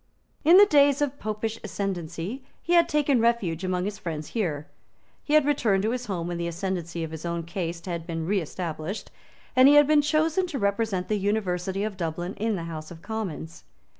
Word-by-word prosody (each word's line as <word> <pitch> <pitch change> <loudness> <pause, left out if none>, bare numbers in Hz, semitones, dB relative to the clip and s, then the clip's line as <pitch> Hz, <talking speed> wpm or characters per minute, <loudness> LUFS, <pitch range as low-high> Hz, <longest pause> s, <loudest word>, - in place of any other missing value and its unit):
In 335 +4 +7
the 410 - +10
days 285 -5 +4
of 285 -1 -1
Popish 215 +1 -3
ascendancy 195 - -4 0.2
he 345 - 0
had 340 -1 +5
taken 290 -5 +2
refuge 210 -8 +1
among 185 -1 -1
his 205 0 -4
friends 155 -3 -5
here; 160 -10 -2 0.6
he 300 - +1
had 305 -2 +5
returned 220 -9 +2
to 220 - +1
his 250 0 -3
home 180 -5 -2
when 175 0 -3
the 170 - -1
ascendancy 170 -1 -3
of 160 - -5
his 160 -1 -7
own 170 -1 -2
caste 170 0 -4
had 170 -2 -4
been 165 -2 -3
reestablished; 175 -1 -3 0.4
and 255 +1 +8
he 290 - +7
had 295 0 +8
been 300 +1 +4
chosen 315 +4 +1
to 320 -5 -4
represent 200 -3 0
the 210 -1 0
University 195 -2 -1
of 210 -2 -3
Dublin 175 +2 -3
in 220 0 0
the 170 - -4
House 155 -2 -6
of 165 -1 -12
Commons. 190 -7 -5
195 Hz, 195 wpm, -26 LUFS, 170-250 Hz, 0.6 s, the